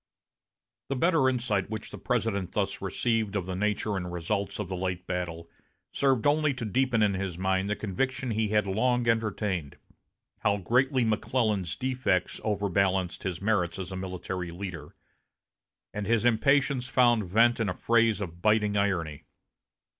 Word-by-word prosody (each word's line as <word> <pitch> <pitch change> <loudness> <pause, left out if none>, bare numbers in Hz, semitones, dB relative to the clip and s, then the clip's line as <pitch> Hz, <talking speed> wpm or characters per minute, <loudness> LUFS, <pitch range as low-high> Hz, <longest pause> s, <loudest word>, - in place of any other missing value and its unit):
The 135 - 0
better 160 -2 +3
insight 115 -7 -1
which 110 0 -6
the - - -8
President 110 -7 -1
thus 100 -2 -1
received 110 +2 -1
of 95 -4 -1
the 95 0 -4
nature 105 +1 0
and 90 -2 -4
results 95 +3 -2
of 105 - -3
the 95 - -4
late 90 0 -3
battle 85 -2 -4 0.4
served 135 -4 +1
only 145 -1 +3
to 125 -2 -4
deepen 120 0 +2
in 100 -1 +3
his 95 -2 -3
mind 95 +1 0
the 105 - 0
conviction 125 +6 -2
he 110 0 0
had 105 0 +2
long 120 +5 +1
entertained 105 -8 -1 0.6
how 105 -1 +2
greatly 125 - +2
McClellan's 105 -5 0
defects 125 -6 -1
overbalanced 100 -3 0
his 95 -1 -4
merits 100 -5 +1
as 95 0 -6
a - - -4
military 95 -1 -4
leader; 85 -4 -7 1.0
and 105 -1 -4
his 115 0 +2
impatience 135 +2 +3
found 120 -5 +3
vent 115 +5 +4
in 110 -3 0
a 90 - -3
phrase 115 -1 +2
of 85 -3 -6
biting 105 0 +2
irony. 85 -7 -1
105 Hz, 155 wpm, -28 LUFS, 95-115 Hz, 1.0 s, vent